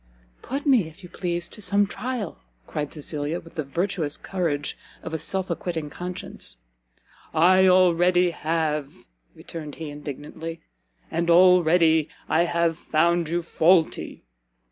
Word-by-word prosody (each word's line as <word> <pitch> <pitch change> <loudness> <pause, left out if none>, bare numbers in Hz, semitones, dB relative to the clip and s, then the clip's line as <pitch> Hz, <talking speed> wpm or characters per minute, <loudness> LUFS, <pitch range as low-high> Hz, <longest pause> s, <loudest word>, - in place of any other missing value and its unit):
"Put 275 +4 -4
me, 250 - +4
if 160 +5 -14
you 180 - -10
please, 175 -1 -3
to 215 - -4
some 200 +1 +2
trial!" 230 -1 -4 0.3
cried 150 -1 -4
Cecilia, 150 +1 -3
with 165 - -15
the 155 - -3
virtuous 165 +1 -2
courage 165 -6 -2 0.3
of - - -6
a 160 - -1
self 185 +3 -3
acquitting 160 -3 -3
conscience. 180 - -4 0.8
"I 185 +4 +6
already 180 -1 +4
have!" 155 -3 -1 0.5
returned 150 -4 -8
he, 160 -2 -6
indignantly, 150 +3 -7 0.5
"and 170 +1 -1
already 170 -3 +5 0.2
I 170 +2 +3
have 170 -1 0
found 170 +1 +1
you 170 +1 -1
faulty!" 165 0 +2
170 Hz, 130 wpm, -25 LUFS, 155-180 Hz, 0.8 s, I